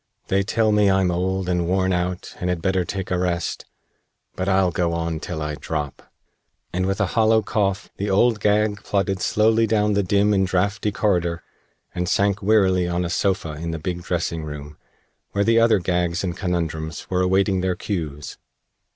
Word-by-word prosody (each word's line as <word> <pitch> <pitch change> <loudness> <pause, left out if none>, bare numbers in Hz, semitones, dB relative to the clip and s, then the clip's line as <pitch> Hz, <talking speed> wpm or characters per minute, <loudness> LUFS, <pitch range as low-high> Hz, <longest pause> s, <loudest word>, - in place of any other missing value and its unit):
They 95 +1 +3
tell 110 +2 +1
me 105 -1 +4
I'm 95 -1 +2
old 95 +1 -1
and 90 -2 0
worn 95 +1 +1
out 90 +1 -2
and 90 - -2
had 90 -1 0
better 95 +1 +1
take 95 +1 -5
a 90 - +1
rest, 90 -2 -2 0.7
but 95 +1 -2
I'll 95 -1 +3
go 85 -2 0
on 85 -1 -2
till 80 -1 -5
I 75 0 -3
drop," 75 -2 -5 0.6
and 95 +1 0
with 95 0 -1
a 100 - +3
hollow 110 -1 +4
cough 100 -2 -1
the 100 +1 -2
Old 105 +3 +3
Gag 105 0 +1
plodded 95 -1 -1
slowly 110 +1 +3
down 105 -1 +2
the 100 - +2
dim 100 +2 +2
and 95 -1 +2
drafty 100 +4 0
corridor 85 -5 0 0.5
and 90 0 -2
sank 100 +1 +1
wearily 95 -4 +3
on 90 0 -1
a 85 - -3
sofa 90 -6 0
in 80 +3 -5
the 80 - -3
big 90 +2 -4
dressing 85 -2 -2
room, 75 -1 -7 0.6
where 100 - +2
the 115 +2 +4
other 115 -1 +5
Gags 90 -1 -1
and 90 -2 -2
Conundrums 85 -4 -3
were 90 0 +2
awaiting 95 +1 +2
their 90 -1 0
cues. 80 -8 -5
95 Hz, 185 wpm, -22 LUFS, 85-100 Hz, 0.7 s, other